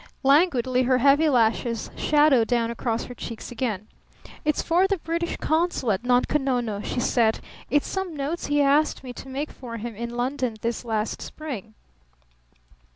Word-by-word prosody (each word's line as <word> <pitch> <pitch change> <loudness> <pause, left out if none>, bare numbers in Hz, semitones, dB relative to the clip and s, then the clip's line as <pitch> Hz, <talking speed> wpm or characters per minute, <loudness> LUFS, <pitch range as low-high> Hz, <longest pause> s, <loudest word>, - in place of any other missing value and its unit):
Languidly 265 -4 +3
her 255 0 +3
heavy 280 +4 +4
lashes 230 -2 +1
shadowed 295 -6 +4
down 235 -2 +1
across 235 0 -2
her 245 - -8
cheeks 230 -1 -7
again. 220 -5 -3 0.6
"It's 300 -1 +1
for 355 +3 +3
the 395 0 0
British 335 +1 -3
consul 315 -7 0
at 190 - 0
Nunko 250 +4 +2
Nono," 245 -6 -1
she 245 - -3
said. 230 -3 +2 0.3
"It's 290 +2 +2
some 380 -4 -3
notes 295 +4 -3
he 290 0 +3
asked 285 +2 +2
me 250 -1 -7
to 265 - -10
make 280 +3 -4
for 235 -3 -8
him 230 0 -6
in 235 +2 -5
London 255 -1 -1
this 235 +1 -2
last 220 -2 -2
spring." 235 -9 -7
255 Hz, 160 wpm, -25 LUFS, 235-295 Hz, 0.6 s, heavy